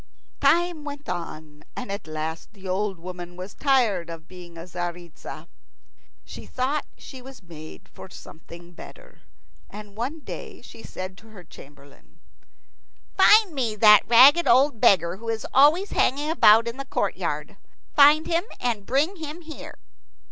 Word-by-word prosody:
Time 330 +2 +1
went 290 0 -9
on, 155 -4 -7
and 250 -5 -6
at 200 -4 -6
last 155 +4 -6
the 195 -2 -12
old 195 +1 -2
woman 175 0 -9
was 185 +2 -9
tired 230 - +1
of 165 -1 -10
being 175 -2 -13
Tzaritza. 175 -1 -8 0.8
She - - -11
thought 270 +3 -2
she 260 - -12
was 265 -4 -14
made 155 -3 -13
for - - -13
something 170 +1 -13
better. - - -15 0.5
And 205 -1 -12
one 265 +8 -5
day - - -9
she - - -13
said 185 -1 -8
to 225 - -19
her 210 -5 -14
chamberlain, 145 -3 -18 1.0
"Find 420 -5 +5
me 240 -6 -2
that 210 -1 +7
ragged 270 +8 +6
old 255 -1 +3
beggar 175 -1 +3
who 230 +2 -8
is 225 -1 -3
always 305 +9 +4
hanging 290 +4 0
about 225 -7 +5
in 235 +2 -5
the 275 - -6
courtyard. - - -3 0.4
Find 300 +2 +6
him, 340 +2 -1
and 225 -5 -3
bring 300 +9 0
him 315 +1 -8
here." 315 -2 -10
215 Hz, 150 wpm, -24 LUFS, 175-285 Hz, 1.0 s, that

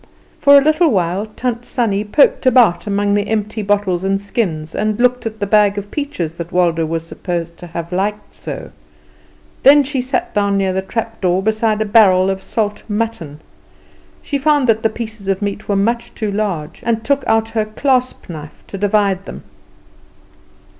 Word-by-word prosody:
For 285 0 +7
a 280 - +5
little 310 +2 +3
while 185 0 0
Tant 240 +2 -4
Sannie 215 -5 -1
poked 260 +5 +3
about 235 -6 +4
among 205 0 +1
the 205 0 0
empty 215 0 -2
bottles 200 -3 0
and 195 0 0
skins, 175 -7 -3
and 215 +1 -1
looked 250 -1 +2
at 220 -1 -7
the 205 - -1
bag 205 0 +3
of 205 0 -6
peaches 185 - -4
that 170 0 -6
Waldo 170 -3 +1
was 165 0 -3
supposed 170 -1 -5
to 175 - -10
have 170 0 -6
liked 205 +3 -2
so; - - -8 0.9
then 285 +2 +7
she 270 -1 -2
sat 255 0 -2
down 200 -1 +1
near 190 -1 0
the 190 - -1
trap 225 +3 -5
door 185 0 +1
beside 220 0 +1
a - - -6
barrel 195 -3 +5
of 190 0 -4
salt 210 0 -2
mutton. 205 -9 -3 0.8
She 280 - -2
found 290 -1 +2
that 220 -1 +3
the 225 - +2
pieces 220 -3 -7
of 195 -1 0
meat 205 +1 -4
were 200 - +2
much 235 +4 -1
too 215 -3 -2
large, 195 -7 -3
and 225 -1 -1
took 280 +2 +1
out 225 0 +2
her 225 -1 -1
clasp 255 +3 -1
knife 150 -3 -10
to 195 - -6
divide 200 -2 +1
them. - - -9
210 Hz, 180 wpm, -17 LUFS, 190-230 Hz, 0.9 s, For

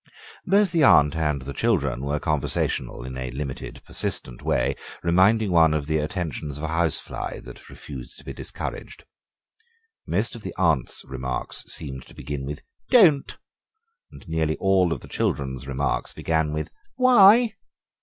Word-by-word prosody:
Both 200 0 +4
the 170 -2 +2
aunt 75 - +6
and 75 -4 -1
the 70 +1 -6
children 70 - 0
were 70 +1 -1
conversational 75 -5 -1
in 65 0 -7
a 65 -1 -4
limited, 65 +1 -6
persistent - - -3
way, - - 0 0.3
reminding 95 +5 +3
one 80 -2 +5
of 75 -2 -1
the 80 +1 0
attentions 75 -3 -4
of 75 - -8
a 80 - -2
housefly 85 -2 0
that - - -13
refuses 65 -5 -9
to - - -14
be - - -6
discouraged. - - -6 1.0
Most 105 +6 0
of 115 - -9
the - - -7
aunt's 80 -8 +1
remarks 65 -1 -3
seemed 65 -4 -4
to - - -16
begin 70 0 -5
with 75 +1 -6 0.3
"Don't," 170 - +5 0.7
and - - -14
nearly 80 -1 0
all 95 -3 +3
of - - -3
the - - -12
children's 65 -1 -2
remarks 70 0 -2
began 80 -2 0
with 75 0 -4 0.2
"Why?" 240 -3 +6
80 Hz, 155 wpm, -24 LUFS, 70-95 Hz, 1.0 s, aunt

